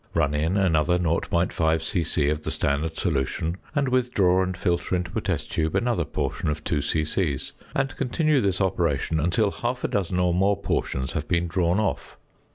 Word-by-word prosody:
Run 75 -3 +2
in 80 +6 +1
another 90 -2 +3
0.5 85 -1 +1
c.c. 80 -3 0
of 75 0 -1
the - - -3
standard 80 +3 0
solution, 80 +1 -1 0.2
and 145 -2 +2
withdraw 120 -8 +2
and 95 -1 -2
filter 90 0 0
into 90 0 -3
a - - 0
test - - -2
tube 80 0 -1
another 120 -9 +1
portion 75 - -2
of 75 +1 -3
2 75 -2 0
c.c.; 75 0 0 0.4
and 135 -1 0
continue 145 +2 +1
this 95 -2 +1
operation 85 -5 0
until 95 +6 +2
half 125 +1 -3
a - - +2
dozen 95 -3 -1
or 90 -1 +2
more 95 +2 +2
portions 65 -9 -2
have 80 0 -3
been 85 -1 +1
drawn 85 +2 +1
off. 105 - -2
85 Hz, 175 wpm, -25 LUFS, 80-100 Hz, 0.4 s, another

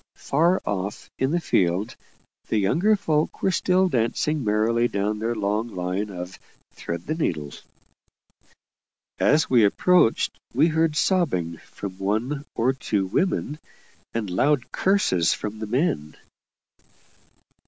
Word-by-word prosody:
Far 170 +6 +1
off, 100 0 -4
in 130 - +1
the 170 +3 +1
field, 95 - 0 0.5
the 110 - 0
younger 170 - +3
folk 155 -6 -1
were 190 - +3
still 185 0 +2
dancing 140 +2 0
merrily 110 +3 +2
down 105 0 -2
their 115 +2 -1
long 105 +2 -1
line 95 0 -3
of 90 -1 -7 0.3
"Thread 85 0 -6
the 155 - -1
needle." 80 - -2 1.7
As 155 +1 +3
we 120 -4 +4
approached, 145 - +3 0.2
we 155 +6 +4
heard 160 -1 +1
sobbing 125 - +1
from 95 +2 -9
one 115 +9 -1
or 125 +3 +2
two 105 -7 -1
women, 150 - -1 0.5
and 115 -2 -3
loud 130 +6 +1
curses 185 - +2
from 105 +1 -6
the 110 - -4
men. 110 - -1
115 Hz, 125 wpm, -24 LUFS, 100-155 Hz, 1.7 s, we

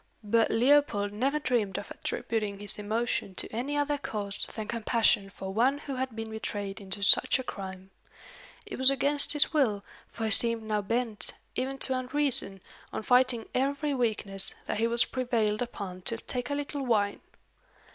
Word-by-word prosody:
But 225 +2 +2
Leopold 235 -5 +2
never 270 +8 0
dreamed 240 -9 -1
of - - -7
attributing 210 -3 -3
his 205 0 -2
emotion 215 -2 -2
to - - -1
any 275 +5 -2
other 290 0 0
cause 205 -6 -2
than 220 -2 -7
compassion 225 -3 +1
for 190 -1 -7
one 255 +6 +2
who 280 -2 -6
had 260 -3 -3
been 225 -1 -6
betrayed 205 -2 -5
into 200 +1 -4
such 200 - +6
a 260 - -5
crime. 190 -4 -8 0.7
It 410 - -8
was 260 0 +10
against 285 +2 +3
his 295 +1 +5
will, 220 -10 +1 0.3
for 225 - -4
he 220 - -1
seemed 230 0 +4
now 215 -1 -1
bent, 225 -1 +1 0.2
even 270 +1 -3
to 265 - -2
unreason, 255 -7 0 0.3
on - - -5
fighting 250 -1 +3
every 280 +3 -1
weakness, 210 -6 -1
that - - -3
he 230 - +2
was 235 +1 +3
prevailed 230 -4 -1
upon 200 -6 -6
to 230 - -3
take 245 +1 -4
a 285 - -1
little 285 -1 -4
wine. 210 -5 0
230 Hz, 170 wpm, -28 LUFS, 205-260 Hz, 0.7 s, was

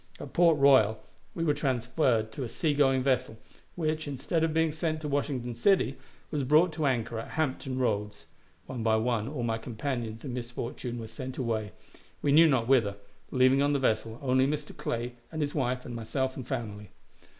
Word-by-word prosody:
At - - -8
Port 170 -3 +5
Royal 130 -6 +5 0.4
we 165 - -1
were 150 -3 +3
transferred 125 -4 0
to 135 - -5
a 120 - -4
sea 155 +5 0
going 135 -2 +3
vessel, 130 -4 0 0.4
which, 155 -2 -1
instead 145 +4 -1
of 165 - +2
being 160 0 +2
sent 155 0 -2
to 150 - -4
Washington 135 -4 -1
City, 135 - +2 0.4
was 145 -2 -1
brought 155 +6 +4
to 155 -2 0
anchor 115 -3 -1
at 115 - -6
Hampton 135 -3 -1
Roads. 105 -4 -1 0.4
One 125 -3 -5
by 110 0 +3
one 110 -1 0
all 135 -3 -4
my 115 -1 -1
companions 115 -1 -4
in 130 - -4
misfortune 120 0 -5
were 115 - -5
sent 130 +3 -7
away, 110 -6 -2 0.5
we 145 - +3
knew 160 +3 +7
not 125 -5 +2
whither, 115 -7 +3 0.3
leaving 130 +1 +4
on 145 +1 +2
the - - +3
vessel 110 -3 0
only 130 0 +3
Mr. 150 +1 -3
Clay 120 +1 -3 0.2
and 160 - -5
his 145 - -3
wife 125 -2 -1
and 120 - -6
myself 130 +4 -2
and 130 -3 -7
family. 105 -4 -5
130 Hz, 190 wpm, -29 LUFS, 115-145 Hz, 0.5 s, knew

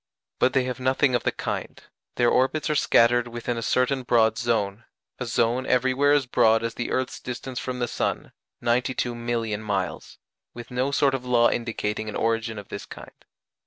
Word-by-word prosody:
But 130 - +3
they 130 - +3
have 125 0 -4
nothing 130 +1 +2
of 120 - +2
the - - 0
kind; - - -5 0.4
their 120 -1 +3
orbits 135 +5 +1
are - - +1
scattered 120 -3 +4
within 120 +1 -4
a 115 - -4
certain 130 +3 +1
broad 115 -3 +3
zone 115 -2 -1 0.3
a 125 - -3
zone 120 +2 +1
everywhere 130 +3 +3
as 145 -2 +3
broad 115 -2 +3
as 115 0 -2
the 120 - -4
earth's 130 0 -2
distance 125 +1 -6
from 130 -1 -4
the 120 -1 -1
sun, - - -2 0.3
92,000,000 120 -2 -1
miles 95 -6 -3 0.4
with 120 0 -9
no 125 +2 0
sort 140 -1 +2
of 135 -2 -2
law 120 -1 +3
indicating 110 -2 -3
an - - -6
origin 115 0 -1
of 100 -1 -9
this - - -7
kind. - - -11
120 Hz, 180 wpm, -25 LUFS, 115-130 Hz, 0.4 s, scattered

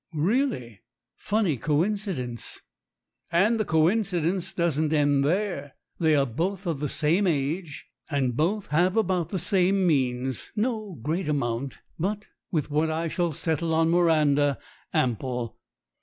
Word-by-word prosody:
"Really? 155 - 0 0.3
Funny 205 -9 0
coincidence." 155 - -1 0.7
"And 210 +7 +3
the 215 - +1
coincidence 175 +1 +1
doesn't 155 -3 0
end 145 -2 +3
there. 165 -3 -1 0.2
They 160 -2 +4
are 140 -1 +3
both 175 - -2
of 165 -5 -1
the 150 -1 -2
same 170 +8 +2
age, 155 +1 -2 0.2
and 135 -5 0
both 190 - 0
have 180 +7 +2
about 185 -6 +1
the 195 - -2
same 190 +1 +2
means 130 -5 0
no 215 -3 -1
great 165 +3 -1
amount, 135 -2 -1 0.2
but, 205 +5 -2 0.3
with 155 -3 -1
what 155 +2 +2
I 160 +1 -1
shall 175 0 0
settle 160 +2 -1
on 165 0 +3
Miranda, 150 -5 +3 0.3
ample. 125 -1 -1
160 Hz, 130 wpm, -26 LUFS, 145-190 Hz, 0.7 s, They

